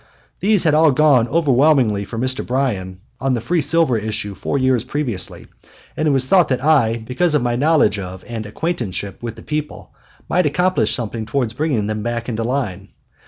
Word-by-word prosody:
These 205 -1 +3
had 155 - +3
all 155 +1 +5
gone 140 -4 +4
overwhelmingly 135 -9 +2
for 115 - -7
Mr. 130 +2 -1
Bryan 100 -9 -2 0.2
on 135 -1 0
the - - -1
free 165 +9 0
silver 155 -2 +2
issue 105 -1 -4
four 140 - -3
years 130 -3 +2
previously, 120 - -4 0.5
and 155 - 0
it - - +3
was 135 -1 +1
thought 180 +1 +4
that 130 0 -1
I, 120 -8 +3
because 150 +6 +1
of 145 - +1
my 120 -1 0
knowledge 140 -7 +2
of 95 -1 -7
and 115 -3 -5
acquaintanceship 105 - -4
with 115 -2 -5
the - - -13
people, 150 -1 -5 0.3
might 180 -3 +2
accomplish 180 +5 +1
something 115 -2 -4
towards 120 -1 -1
bringing 130 -5 -1
them 105 0 -3
back 120 +1 -3
into 115 -2 -2
line. 120 -6 -3
125 Hz, 185 wpm, -19 LUFS, 110-150 Hz, 0.5 s, all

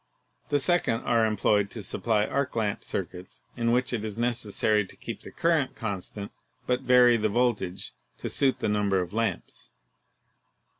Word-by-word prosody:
The 145 - +3
second 145 -6 +1
are 115 -2 +2
employed 105 -1 +1
to 110 -1 -5
supply 105 +2 +1
arc 140 +2 -2
lamp 105 -3 -1
circuits 90 -1 -6
in 115 -1 0
which 125 +1 +1
it 110 -3 -2
is 110 -1 -5
necessary 110 -3 +1
to 95 - -13
keep - - -7
the - - -10
current 165 -5 0
constant 100 -1 -5 0.3
but 125 0 0
vary 125 -1 +5
the 110 -1 0
voltage 105 -5 -1 0.2
to - - -5
suit 135 -2 +2
the - - 0
number 105 -2 +1
of 90 0 -4
lamps. 115 +1 -3
110 Hz, 160 wpm, -27 LUFS, 105-125 Hz, 0.3 s, vary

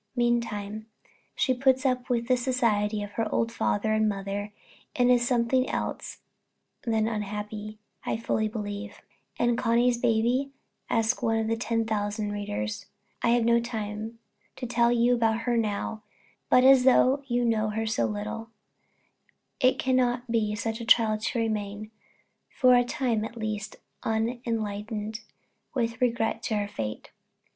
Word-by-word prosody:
Meantime 220 -3 -1 0.5
she 260 - +2
puts 260 +1 +2
up 255 -1 0
with 235 -1 0
the 255 - +4
society 225 -5 +1
of 205 - -7
her 225 0 -2
old 230 0 +1
father 215 -1 0
and 215 0 +3
mother, 200 +1 -4 0.4
and 245 0 +4
is 240 -1 +3
something 250 +1 +2
else - - -4 0.6
than 220 -2 +1
unhappy, 210 0 -4 0.3
I - - -1
fully 220 -1 0
believe. 205 -1 -6 0.3
"And 240 0 +1
Connie's 240 0 +2
baby?" 245 +4 +1 0.4
asks 225 +2 +1
some - - -1
one 225 0 +2
out 220 - -2
of 225 - 0
ten 230 -1 0
thousand 210 -1 -2
readers. 105 - -4 0.3
I - - +2
have 235 -1 +3
no 235 0 +4
time 220 -1 -5 0.4
to 255 - -5
tell 235 0 +2
you 240 +1 +3
about 225 -1 +1
her 240 +1 0
now; 215 -1 -1 0.5
but 250 - +6
as 265 -1 +7 0.4
you 245 -1 +1
know 215 -2 +1
her 220 +1 -2
so 165 - +1
little, 105 - -5 1.1
it 255 -2 +4
cannot 250 -2 +1
be 215 -2 +1
such 225 +2 -3
a - - -5
trial 220 -2 +4
to 225 +2 -2
remain, 215 -1 -3 0.6
for 255 -2 +4
a 245 0 +5
time 240 -3 -1
at 235 +2 -7
least, 215 -2 -4 0.3
unenlightened 220 -2 -2 0.6
with 230 -1 -1
regard 230 -2 +1
to 220 - -1
her 205 0 -1
_fate. 110 - -5
225 Hz, 150 wpm, -27 LUFS, 210-240 Hz, 1.1 s, as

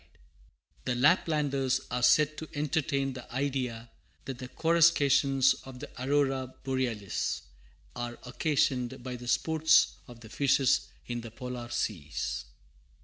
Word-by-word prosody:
[Footnote - - -31
A: - - -32
The 125 - 0
Laplanders 140 -3 +2
are 125 - -1
said 150 +4 +4
to 160 - -7
entertain 145 -2 0
the 130 -1 -10
idea 125 -3 -2 0.3
that 130 -2 -6
the 130 - -6
coruscations 145 -4 +4
of 130 -1 -10
the 145 - -8
Aurora 135 -2 0
Borealis, 125 -7 -2 0.5
are 120 0 -5
occasioned 130 -1 0
by 125 -1 -5
the 120 0 -9
sports 160 +4 +3
of 120 -1 -13
the 110 - -12
fishes 135 +2 +2 0.2
in 120 -1 -4
the 115 - -8
polar 125 0 -7
seas. 85 -11 -3
130 Hz, 135 wpm, -29 LUFS, 120-145 Hz, 0.5 s, said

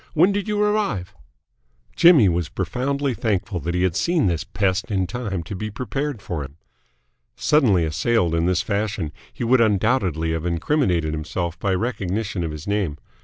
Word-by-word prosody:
When 175 +6 +5
did 200 +1 -2
you 210 -1 0
arrive?" 210 - 0 0.8
Jimmy 165 - +7
was 85 -3 0
profoundly 135 +8 -1
thankful 105 -4 -1
that 85 +3 -3
he 90 - +1
had 90 -3 +1
seen 170 -7 +2
this 85 -1 0
pest 100 +1 -1
in 95 -3 0
time 95 -3 -4
to 95 +5 -6
be 110 +3 -4
prepared 130 +2 -4
for 80 -4 -3
him. 70 +3 -11 0.8
Suddenly 105 - +3
assailed 85 +2 +1
in 85 +1 +1
this 90 -1 +1
fashion, 100 -6 -2 0.2
he - - -6
would 120 +1 +4
undoubtedly 100 - +1
have 80 -1 -2
incriminated 85 - 0
himself 85 +2 -3
by 95 -1 0
recognition 100 -3 -2
of 80 - -2
his 75 0 -7
name. 100 -8 -1
100 Hz, 170 wpm, -22 LUFS, 85-125 Hz, 0.8 s, Jimmy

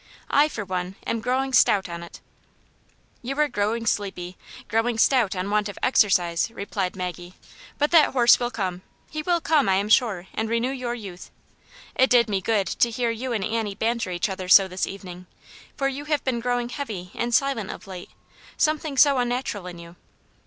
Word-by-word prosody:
I, 290 +1 +5
for 215 -9 -6
one, 185 0 -4
am 230 - -2
growing 260 +3 -1
stout 200 -6 +4
on 170 -1 -7
it." 170 - -11 0.5
" - - -37
You 270 +2 -5
are 300 - +4
growing 225 -1 -1
sleepy 190 -4 -2 0.2
— - - -15
growing 225 +2 0
stout 230 -5 +3
on 185 +2 -3
want 210 0 +1
of 205 - -9
exercise," 180 -7 +2
replied 200 -4 -4
Maggie. 180 -1 -6 0.2
" - - -20
But 295 +1 +1
that 325 -5 +5
horse 240 -2 +6
will 240 - -1
come; 190 -6 -4 0.3
he 310 - -3
will 345 +2 +1
come, 305 -8 +2
I 190 - +4
am 200 +2 -1
sure, 215 -6 +3
and 220 0 -2
renew 235 +3 0
your 250 -3 -3
youth. 195 -6 -9 0.6
It 260 - +3
did 235 -2 +4
me 195 -1 0
good 205 -1 +1
to 235 - +1
hear 235 0 -1
you 245 +3 -4
and 215 -4 -1
Annie 220 -3 -2
ban 235 +3 0
ter 225 -5 -3
each 175 +1 -1
other 190 -2 -6
so 195 +1 +8
this 185 0 -3
evening, 180 -2 -9 0.5
for 275 - +1
you 275 +2 -4
have 300 -1 0
been 255 -3 -1
growing 245 0 -1
heavy 215 -10 -6
and 240 0 -2
silent 250 -5 +1
of - - -8
late; 185 -2 -9 0.5
something 310 -2 0
so 280 -1 +5
un 245 -1 0
natural 240 -6 -3
in 175 -1 -8
you." 170 +1 -12
225 Hz, 205 wpm, -24 LUFS, 190-255 Hz, 0.6 s, so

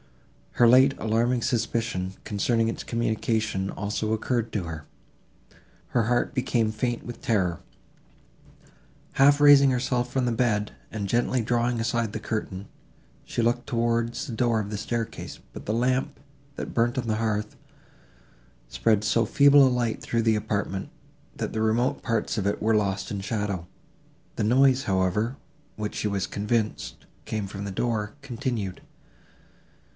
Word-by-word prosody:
Her 120 - +6
late 130 +3 +6
alarming 115 +2 +1
suspicion, 115 -5 -1
concerning 115 +2 +1
its 115 - -3
communication, 110 -4 -1
also 105 +2 -3
occurred 115 +1 -1
to 105 - -2
her. 80 -3 -7 1.0
Her 120 - +2
heart 120 +1 +1
became 120 -4 +1
faint 120 +2 -2
with 120 - -8
terror. 95 -7 0 1.5
Half 145 +2 +5
raising 145 -1 +7
herself 125 -1 0
from 130 -2 0
the 120 - +1
bed, 110 -3 0 0.2
and 105 -2 -3
gently 120 +3 +1
drawing 120 +1 0
aside 115 -1 0
the 110 - -4
curtain, 105 -3 -4 0.6
she - - -2
looked 120 +1 0
towards 115 +2 0
the 130 - -6
door 115 0 +1
of 105 -1 -4
the 105 - -3
staircase, 115 +2 -4
but - - -9
the 105 - 0
lamp, 125 +3 0 0.4
that - - -6
burnt 120 +1 +1
on 120 -2 -2
the 110 - +1
hearth, 105 -2 -1 1.1
spread 105 - +1
so 110 +2 +2
feeble 140 +5 +6
a - - +4
light 120 -3 -1
through 115 -1 -1
the 110 -1 +3
apartment, 100 -2 -2 0.5
that - - -4
the 110 - -1
remote 120 +5 +1
parts 115 -1 -1
of 100 -2 0
it 100 - -1
were 110 +1 +3
lost 100 -2 0
in 100 -1 -3
shadow. 100 -4 -3 0.7
The - - -1
noise, 130 +4 +4
however, 100 +6 0 0.4
which, 105 -1 -4
she - - -1
was 100 -3 -1
convinced, 105 - -2 0.2
came 105 -2 -3
from 100 +1 -6
the 100 - -4
door, 105 0 -2
continued. 120 -7 -3
115 Hz, 150 wpm, -26 LUFS, 105-120 Hz, 1.5 s, raising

